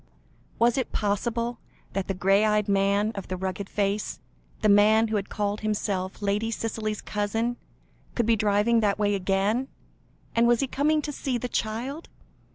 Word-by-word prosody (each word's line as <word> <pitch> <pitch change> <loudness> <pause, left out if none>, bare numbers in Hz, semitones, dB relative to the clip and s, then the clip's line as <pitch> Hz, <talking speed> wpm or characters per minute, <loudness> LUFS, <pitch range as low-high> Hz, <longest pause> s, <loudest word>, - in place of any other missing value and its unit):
Was 235 +2 +3
it 260 - -3
possible 230 +3 -1 0.3
that 195 -1 -2
the 195 - -2
grey 195 +3 +3
eyed 210 -1 +2
man 200 +1 +2
of 195 -3 -6
the 185 - -3
rugged 190 +1 -4
face, 205 0 -1 0.4
the - - +5
man 215 +2 +5
who 220 - -1
had 200 -1 -2
called 205 0 -2
himself 205 -2 -2
Lady 205 +3 0
Cicely's 215 -1 -3
cousin, 225 +3 -1 0.6
could 235 - +1
be 230 0 +4
driving 210 +2 +3
that 205 -3 +1
way 205 -1 +1
again? 200 +6 +1 0.7
And 230 +1 +4
was 240 -1 +4
he - - +2
coming 300 +3 +1
to 295 - -3
see 265 -3 -2
the 250 - -3
child? 245 +8 -3
215 Hz, 165 wpm, -26 LUFS, 200-230 Hz, 0.7 s, the